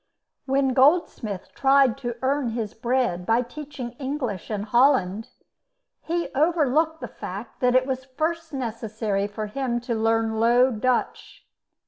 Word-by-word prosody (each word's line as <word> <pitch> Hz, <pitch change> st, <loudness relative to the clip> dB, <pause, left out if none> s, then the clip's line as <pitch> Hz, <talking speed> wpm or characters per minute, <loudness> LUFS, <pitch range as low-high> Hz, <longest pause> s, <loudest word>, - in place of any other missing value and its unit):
When 270 Hz, 0 st, +2 dB
Goldsmith 260 Hz, -, +2 dB
tried 270 Hz, -3 st, +4 dB
to 240 Hz, -3 st, -4 dB
earn 275 Hz, -1 st, +1 dB
his 225 Hz, -3 st, -3 dB
bread 240 Hz, -6 st, 0 dB
by 225 Hz, +6 st, +2 dB
teaching 270 Hz, -1 st, -7 dB
English 260 Hz, -, -3 dB
in 210 Hz, -2 st, -2 dB
Holland, 225 Hz, -3 st, +2 dB, 0.7 s
he 340 Hz, +1 st, -2 dB
overlooked 315 Hz, +1 st, +2 dB
the -, -, -4 dB
fact 200 Hz, +6 st, -8 dB
that 250 Hz, 0 st, +2 dB
it 255 Hz, 0 st, +4 dB
was 260 Hz, -1 st, -3 dB
first 320 Hz, +4 st, -3 dB
necessary 220 Hz, -5 st, -2 dB
for 210 Hz, +1 st, -5 dB
him 240 Hz, +2 st, -2 dB
to 240 Hz, 0 st, -3 dB
learn 225 Hz, 0 st, +1 dB
Low 240 Hz, +3 st, +4 dB
Dutch. 250 Hz, +2 st, -2 dB
250 Hz, 135 wpm, -24 LUFS, 225-275 Hz, 0.7 s, tried